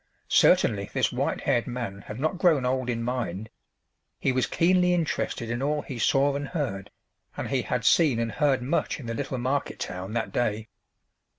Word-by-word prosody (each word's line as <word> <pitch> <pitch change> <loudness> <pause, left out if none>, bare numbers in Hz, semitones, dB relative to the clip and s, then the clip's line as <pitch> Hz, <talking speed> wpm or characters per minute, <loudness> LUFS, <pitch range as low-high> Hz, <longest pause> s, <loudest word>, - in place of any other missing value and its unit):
Certainly 100 -3 +4
this - - +1
white - - -1
haired 120 - +1
man 120 -6 -4
had 105 +3 -8
not 155 +5 -1
grown 155 -8 +3
old 130 0 0
in 115 -1 -1
mind; 110 -4 -3 0.7
he 135 - +1
was 130 -1 +1
keenly 180 +1 +3
interested 140 -7 -2
in 120 +2 -2
all 150 +1 0
he 125 -3 -7
saw 140 +4 +3
and 145 0 -3
heard, 130 - -3 0.5
and - - -4
he - - +1
had - - -2
seen 150 -8 +4
and 115 -1 -1
heard 135 +2 +1
much 130 - -1
in 135 - -9
the 115 - -3
little 130 +2 -3
market 130 +3 -1
town 90 +3 -5
that 115 -1 -2
day. 110 -2 -1
125 Hz, 185 wpm, -26 LUFS, 115-145 Hz, 0.7 s, Certainly